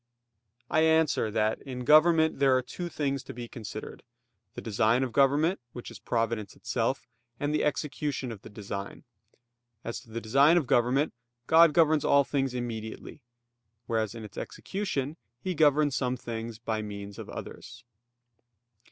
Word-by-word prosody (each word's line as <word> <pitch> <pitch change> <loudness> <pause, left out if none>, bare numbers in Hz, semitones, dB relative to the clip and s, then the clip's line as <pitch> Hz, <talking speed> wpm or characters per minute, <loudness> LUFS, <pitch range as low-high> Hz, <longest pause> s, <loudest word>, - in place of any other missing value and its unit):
I 155 - +2
answer 160 -7 +3
that, 110 0 0
In 125 -2 -6
government 160 +1 +5
there 135 -2 +5
are 130 - -1
two 175 +8 -6
things 140 -4 -1
to - - -10
be 120 -1 -6
considered; 110 -2 -8 0.5
the - - -5
design 110 +3 +2
of 125 -3 -3
government, 145 - +3
which 120 - -8
is - - -11
providence 115 -3 -2
itself; 120 +3 -1 0.3
and 145 +1 -1
the 155 - +1
execution 145 -3 -2
of 105 -4 -9
the - - -11
design. 100 -1 -6 0.8
As 115 - -4
to - - -18
the 115 +1 -4
design 140 +9 +5
of 165 - +2
government, 125 +5 +2 0.3
God 165 +2 +7
governs 155 -1 +4
all 140 0 +5
things 135 -2 -1
immediately; 115 +2 -6 0.6
whereas 110 -1 -1
in 115 - -7
its 105 - -8
execution, 160 -8 -3 0.2
He 185 +5 -2
governs 145 -2 +3
some 125 -1 0
things 115 -1 -6
by 110 -1 -2
means 100 -1 -7
of - - -8
others. - - -9
130 Hz, 155 wpm, -28 LUFS, 115-150 Hz, 0.8 s, God